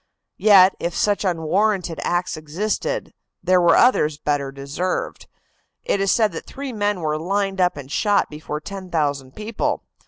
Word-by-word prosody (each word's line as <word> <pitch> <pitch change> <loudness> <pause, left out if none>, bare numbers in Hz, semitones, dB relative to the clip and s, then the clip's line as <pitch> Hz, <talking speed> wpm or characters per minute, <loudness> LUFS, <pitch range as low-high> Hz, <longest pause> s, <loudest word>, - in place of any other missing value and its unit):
Yet, 195 -3 +6
if 170 0 -3
such 205 -1 +1
unwarranted 180 +1 0
acts 175 +1 -1
existed, 205 - -3 0.3
there 180 0 +4
were 170 -1 +5
others 155 - +3
better 145 -2 -1
deserved. 140 +7 -4 0.6
It 200 - 0
is 195 - +2
said 220 -4 +3
that 165 - -8
three 275 -2 -6
men 205 -3 -1
were 155 -1 -1
lined 195 +2 -1
up 180 -4 +2
and 140 -1 -9
shot 205 +2 +2
before 150 0 -6
ten 195 +1 -8
thousand 145 -5 -2
people. 215 +1 -2
180 Hz, 155 wpm, -21 LUFS, 155-205 Hz, 0.6 s, Yet